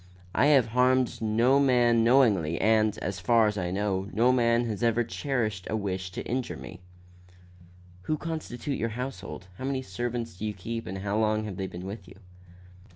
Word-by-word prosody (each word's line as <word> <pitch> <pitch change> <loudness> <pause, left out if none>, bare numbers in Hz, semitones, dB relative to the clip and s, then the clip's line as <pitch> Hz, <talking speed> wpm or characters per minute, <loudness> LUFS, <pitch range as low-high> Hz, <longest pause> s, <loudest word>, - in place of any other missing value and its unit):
I 140 - +3
have 140 -5 +5
harmed 125 +1 +2
no 115 +5 +3
man 120 -4 +4
knowingly 105 - +3
and, 110 -1 +3
as 95 0 -3
far 115 +4 +4
as 105 -1 0
I 90 -3 -2
know, 95 0 -1
no 120 +3 +3
man 120 -1 +2
has 105 -3 -4
ever 120 0 +2
cherished 115 -5 -2
a - - -1
wish 95 -3 -3
to - - -5
injure 125 0 -3
me." 90 -1 -10 1.3
"Who 155 - +1
constitute 150 -4 -4
your 115 - -1
household? 125 -7 -6
How - - -6
many 135 -1 -2
servants 115 +1 -4
do 110 - -3
you 105 - -3
keep 115 +4 -5
and 95 - -4
how 100 +2 -1
long 110 0 +1
have 100 -4 -6
they 95 -1 -3
been 90 0 -8
with 100 -1 -7
you?" 95 - -13
115 Hz, 185 wpm, -27 LUFS, 100-125 Hz, 1.3 s, have